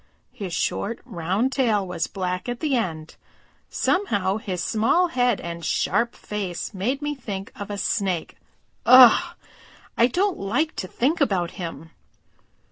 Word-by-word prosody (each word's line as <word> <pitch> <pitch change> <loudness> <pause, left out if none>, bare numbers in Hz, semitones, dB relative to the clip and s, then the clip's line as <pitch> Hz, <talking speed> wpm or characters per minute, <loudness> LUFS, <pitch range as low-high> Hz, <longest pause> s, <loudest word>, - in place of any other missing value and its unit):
His 205 -8 -6
short, 215 +6 -2
round 190 +9 -1
tail 225 -7 +1
was 170 -2 -2
black 185 +2 -3
at 240 0 -4
the 295 -4 0
end. 160 -9 -3 0.5
Somehow 205 - 0
his 190 -5 -4
small 285 +12 +2
head 245 -6 +1
and 170 0 -6
sharp 235 +8 0
face 200 -2 -5
made 250 +10 -2
me 295 0 -1
think 205 -8 -6
of 205 -1 -7
a 205 - -4
Snake. 190 -4 -1 0.5
Ugh! 260 +8 +7 0.6
I 235 - +5
don't 370 +8 0
like 250 +11 -1
to 185 - -3
think 280 - 0
about 190 -10 +1
him!" 165 -3 -7
210 Hz, 140 wpm, -24 LUFS, 185-255 Hz, 0.6 s, Ugh